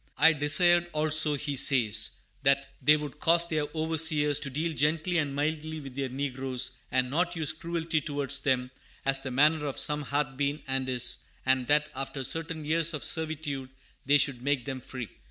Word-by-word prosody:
"I 160 +2 +6
desired, 175 +4 +3
also," 155 0 +4
he 145 0 -4
says, 115 -6 +5 0.3
"that 140 0 +2
they 150 +3 +5
would 150 -1 -8
cause 170 +2 +3
their 155 -3 -1
overseers 155 -2 +2
to 140 - -4
deal 155 +5 -2
gently 155 +4 0
and 145 -3 -2
mildly 155 +2 -3
with 135 -3 -10
their 135 -1 -3
negroes, 130 -1 -3 0.2
and 130 0 0
not 175 +4 0
use 160 -3 -1
cruelty 165 -1 -2
towards 140 -1 -1
them 125 -2 -1 0.3
as 135 0 +2
the 135 - -6
manner 150 +3 +2
of 140 - -5
some 150 0 0
hath 140 -2 -2
been 145 +1 -2
and 130 0 -2
is; 125 -1 +2 0.3
and 130 -1 +1
that, 150 0 +2
after 135 0 -5
certain 165 +2 -3
years 165 +1 +2
of 145 - -6
servitude, 155 -4 -3 0.3
they 145 +2 +4
should 135 -4 +2
make 140 -2 -1
them 135 -2 -5
free." 125 -2 -7
145 Hz, 180 wpm, -28 LUFS, 135-155 Hz, 0.3 s, I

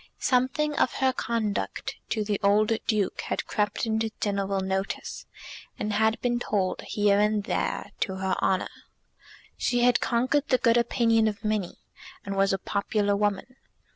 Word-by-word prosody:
Something 260 +4 +1
of - - +2
her 265 -1 +1
conduct 225 -4 -2
to 215 - 0
the 205 -1 -1
old 210 +2 +3 0.2
Duke 210 -4 0
had - - -3
crept 210 +1 -1
into 220 0 0
general 200 -1 -1
notice, 190 +1 -3 0.5
and 210 0 -2
had 220 +2 +2
been 240 -1 0
told, 195 -5 -1
here 205 -1 +2
and 210 0 +2
there, - - -2
to 190 - -1
her 190 0 -1
honour. 190 - +1 0.9
She 245 -1 +1
had 245 -1 +4
conquered 260 +4 +1
the 255 - +3
good 230 -1 +3
opinion 230 -1 +3
of 215 +1 -4
many, 215 -4 -1 0.5
and 200 0 -3
was 195 0 +3
a 195 - +1
popular 205 +1 0
woman. 205 +5 -1
210 Hz, 155 wpm, -27 LUFS, 200-235 Hz, 0.9 s, had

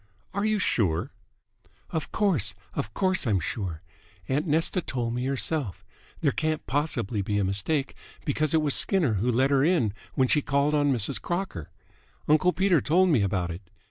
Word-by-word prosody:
"Are 200 +1 -1
you 215 0 +2
sure?" 90 - 0 0.8
"Of 160 - -3
course, 145 - +1 0.2
of 110 - -3
course 185 - +1
I'm 100 -4 +2
sure. 85 -2 -4 0.4
Aunt 145 +6 0
Nesta 165 +4 +2
told 120 -6 -3
me 125 +1 -2
herself. 130 - -2 0.4
There 145 -4 +3
can't 155 +2 -2
possibly 125 -8 -1
be 105 +1 -1
a 100 - +2
mistake, 105 +10 0 0.3
because 155 +2 +1
it 155 - +3
was 145 -2 +2
Skinner 170 - +2
who 120 - +1
let 130 +4 +2
her 135 -1 +4
in 150 - +2 0.2
when 130 - +3
she 150 - +3
called 140 +2 +1
on 145 -1 +3
Mrs. 125 +1 -1
Crocker. 175 - -4 0.6
Uncle 155 +4 +4
Peter 185 -3 +2
told 180 +4 +3
me 140 -10 +3
about 90 -3 -1
it. 85 +3 -7
140 Hz, 175 wpm, -26 LUFS, 105-160 Hz, 0.8 s, her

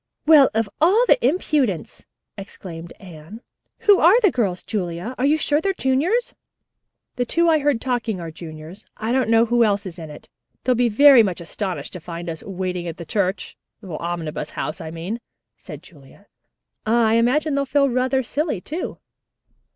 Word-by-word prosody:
"Well, 295 -4 +7
of 225 -1 +1
all 405 +9 +4 0.2
impudence!" 285 - -1 0.3
exclaimed 175 -4 -9
Anne. 175 +3 -11 0.4
"Who 410 -3 +5
are 365 +9 +6
the 405 -6 +4
girls, 195 -7 -1
Julia? 180 +2 -4
Are 265 - +2
you 305 +2 +3
sure 295 0 +1
they're 390 +3 0
juniors?" 320 - 0 0.8
"The 245 - +1
two 340 +5 +2
I 315 -1 +4
heard 285 -4 +1
talking 235 -5 -2
are 165 -1 -6
juniors. 160 +4 -10
I 220 +1 -3
don't 260 -2 +1
know 230 0 +5
who 240 0 +3
else 200 -2 +1
is 180 -2 -8
in 160 -2 -8
it. 150 - -12 0.4
They'll 255 - +2
be 245 0 +2
very 270 +3 +7
much 190 -5 -1
astonished 185 +2 -5
to 180 - -7
find 170 0 -6
us 160 - -8
'waiting 180 -2 -4
at 165 - -6
the 170 - -8
church' 195 +2 -2 0.3
Omnibus 170 -3 -5
House, 155 - -5
I 160 - -6
mean," 175 +8 -5 0.3
said 150 +2 -11
Julia, 155 +3 -18 0.6
"and 220 +2 +1
I 225 -2 +3
imagine 270 +7 +2
they'll 280 0 0
feel 280 +1 +2
rather 260 +1 0
silly, 290 - -2
too." 315 - -6
220 Hz, 175 wpm, -21 LUFS, 175-275 Hz, 0.8 s, Well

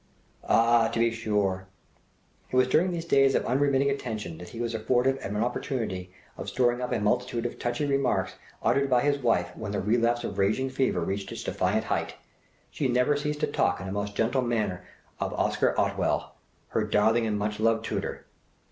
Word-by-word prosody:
Ah! 115 0 +4
to - - -4
be 115 0 +3
sure! 105 -4 -1 0.8
It - - -4
was 130 0 +5
during 165 +8 +3
these 170 -1 -4
days 135 -4 +4
of - - +1
unremitting 140 +2 +2
attention 110 - -4
that 90 - -9
he 115 - -9
was 120 -1 -2
afforded 125 +4 +1
an 105 -4 -4
opportunity 110 -5 -2 0.3
of - - -5
storing 120 -1 +1
up 125 - -3
a 120 - +1
multitude 105 +3 0
of 120 - -4
touchy 120 +4 -1
remarks 140 -1 +1 0.3
uttered 140 0 +2
by 125 -2 +3
his 145 0 +2
wife 120 -2 +1
when 100 - -5
the 100 - -1
relapse 115 +3 +1
of 100 0 -4
raging 110 +7 +1
fever 130 -9 0
reached 95 +3 -3
its - - -6
defiant - - 0
height! - - -2 0.6
She 140 - -1
never 125 +3 +2
ceased 150 0 -2
to - - +3
talk 90 -9 +1
in 95 - -6
a - - -4
most 100 0 -3
gentle 125 +4 +1
manner 105 -7 -1 0.4
of - - -2
"Oscar - - +1
Otwell," - - 0 0.4
"her - - 0
darling 110 +2 +2
and 105 -1 0
much 105 0 -2
loved 115 0 +2
tutor." - - -4
115 Hz, 190 wpm, -27 LUFS, 105-130 Hz, 0.8 s, was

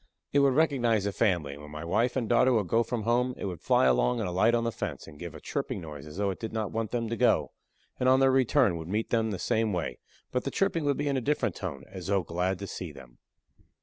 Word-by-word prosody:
It 145 - +5
would 140 -2 +4
recognize 125 -9 +2
the 100 - -1
family, 90 -10 +1
and 70 - -11
when 75 - -10
my 75 +2 -7
wife 115 +9 +1
and 125 -4 -1
daughter 125 +3 +4
would 105 -5 +1
go 115 +6 +3
from 115 -1 -2
home, 125 +2 +1
it - - -5
would 90 -4 -5
fly - - +3
along 60 -1 +3
and - - -1
alight 95 +7 +3
on 115 - +1
the 115 - 0
fence - - -5
and 75 -2 -13
give 85 -3 -7
a - - -8
chirping 135 -6 -3
noise 75 -3 -9
as 75 +3 -10
though 100 -1 +1
it 95 - -7
did 110 - -5
not 110 -3 -2
want 115 -1 -2
them 115 -2 -2
to 115 - -2
go, - - +2 0.5
and 130 - +3
on 130 +1 +5
their 135 0 +5
return 130 - +3
would 80 -1 -7
meet 105 +5 -2
them 115 -1 +2
the 100 - -3
same 110 +3 0
way, 80 -8 -3 0.3
but 125 - -1
the - - -2
chirping 170 -2 0
would 140 -1 +1
be 145 - -1
in 140 -1 +1
a - - -1
different 145 +4 0
tone, 75 -8 -6
as 95 -2 -8
though 100 -2 +2
glad 90 +3 -1
to 100 - -6
see 90 -4 -6
them. 65 -4 -14
110 Hz, 275 wpm, -28 LUFS, 85-125 Hz, 0.5 s, It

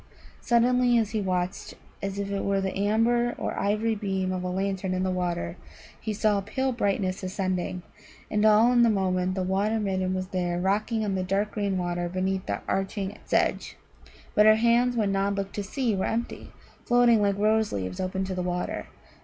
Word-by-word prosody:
Suddenly, 245 0 +3
as 220 -2 +1
he 220 -2 -1
watched, 185 -1 -2 0.3
as 195 0 -4
if 200 0 -3
it 200 - -2
were 200 0 +1
the 190 -1 -2
amber 230 +4 +2
or - - -3
ivory 215 +3 +1
beam 190 -3 -2
of 185 -1 -2
a - - -2
lantern 190 0 -2
in 185 - -1
the 185 - 0
water, 175 - -2 0.4
he 220 - -3
saw 210 -1 +1
a - - -4
pale 260 +7 -1
brightness 200 -5 -1
ascending. 185 -1 -2 0.5
And 210 0 +1
all 220 +2 +6
in 240 -1 +5
a 235 - +5
moment 185 -2 0
the 190 - -1
Water 200 +4 0
midden 190 -2 -1
was 185 0 -4
there 175 -2 -1
rocking 215 +4 0
on 200 - -1
the 190 - -1
dark 195 +3 -1
green 200 -3 -1
water 175 -1 -2
beneath 185 +1 -2
the - - -2
arching 195 +1 -2
sedge. - - 0 0.6
But 210 +1 +5
her 215 - +8
hands, 235 +2 +3
when 210 -3 +1
Nod 195 +1 0
looked 195 0 -3
to 205 - -3
see, 230 +2 -1
were 190 - -1
empty, 235 +1 -3 0.3
floating 240 -2 +4
like 200 -1 +1
rose 215 +1 +2
leaves 95 -2 -4
open 190 +1 -2
on 190 - -3
the 180 - -2
water. 180 0 -3
195 Hz, 195 wpm, -26 LUFS, 185-215 Hz, 0.6 s, her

